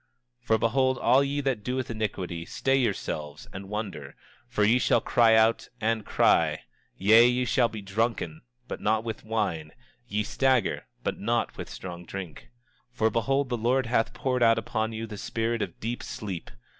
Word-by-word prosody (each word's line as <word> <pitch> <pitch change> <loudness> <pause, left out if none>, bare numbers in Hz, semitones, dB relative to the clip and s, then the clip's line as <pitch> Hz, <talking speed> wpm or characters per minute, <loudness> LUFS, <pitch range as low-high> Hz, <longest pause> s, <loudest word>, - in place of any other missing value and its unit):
27:4 - - -33
For 110 - +4
behold, 130 +4 +2
all 130 +4 +4
ye 140 +1 -1
that 130 -6 -1
doeth 125 +1 -2
iniquity, 95 -6 -3
stay 135 +9 0
yourselves 75 - -2
and 95 0 -8
wonder, 100 -10 -5 0.3
for 120 -3 0
ye 115 +4 +4
shall - - +3
cry 115 -2 +4
out, 110 +1 +3
and 110 0 0
cry; - - +2 0.3
yea, 110 +5 +7
ye 125 +1 +1
shall 125 -1 +3
be 110 -2 -8
drunken 100 -5 -2 0.3
but - - -6
not 110 +1 +1
with 115 -2 -5
wine, 100 -9 -2 0.4
ye 105 +1 -1
shall 105 - -8
stagger 130 -5 +1 0.2
but - - -2
not 115 +2 0
with - - -7
strong 90 -2 -8
drink. 90 +2 -8 0.4
27:5 - - -30
For 110 - +3
behold, 135 +5 +1
the 120 - -1
Lord 125 +3 +1
hath 115 -1 0
poured 130 -2 -1
out 115 -1 +5
upon 110 0 -2
you 110 0 -4
the 105 -2 -8
spirit 115 0 -2
of - - -4
deep 120 +2 -3
sleep. 95 -6 -6
115 Hz, 180 wpm, -27 LUFS, 105-120 Hz, 0.4 s, yea